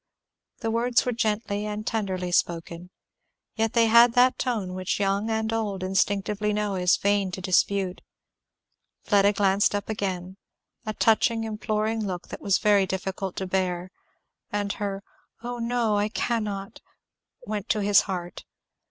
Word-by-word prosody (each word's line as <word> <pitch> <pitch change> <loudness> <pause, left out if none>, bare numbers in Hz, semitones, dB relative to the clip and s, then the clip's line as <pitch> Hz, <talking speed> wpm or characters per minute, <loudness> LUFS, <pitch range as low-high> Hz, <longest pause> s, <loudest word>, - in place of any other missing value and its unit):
The 225 - -1
words 235 +1 +2
were 250 - 0
gently 215 -3 -1
and 210 0 -4
tenderly 190 -6 -2
spoken, 170 0 -1 0.6
yet 225 0 -1
they 230 -1 +4
had 235 +1 +6
that 250 +1 +4
tone 215 -8 -2
which 185 +1 -2
young 200 +2 0
and 220 0 -1
old 205 -4 -2
instinctively 205 +2 0
know 210 -1 -1
it 185 - -2
is 180 +1 +4
vain 200 -1 +1
to - - -4
dispute. 185 0 +1 1.0
Fleda 200 -1 +4
glanced 200 0 +2
up 205 +1 -4
again, 190 -3 -3 0.5
a 215 - -1
touching 225 0 +2
imploring 220 0 -2
look 185 -4 -5
it - - -6
was 195 -2 +2
very 205 -3 +3
difficult 190 0 -4
to 190 - -3
bear, 185 -1 -2 0.6
and 205 -1 -1
her 200 -1 -4 0.4
"Oh 245 0 -4
no 230 -2 0
I 205 +1 +1
cannot," 210 -3 -3 0.6
went 210 0 -4
to 215 - +1
his 205 0 +5
heart. 180 -2 -5
205 Hz, 150 wpm, -26 LUFS, 190-220 Hz, 1.0 s, had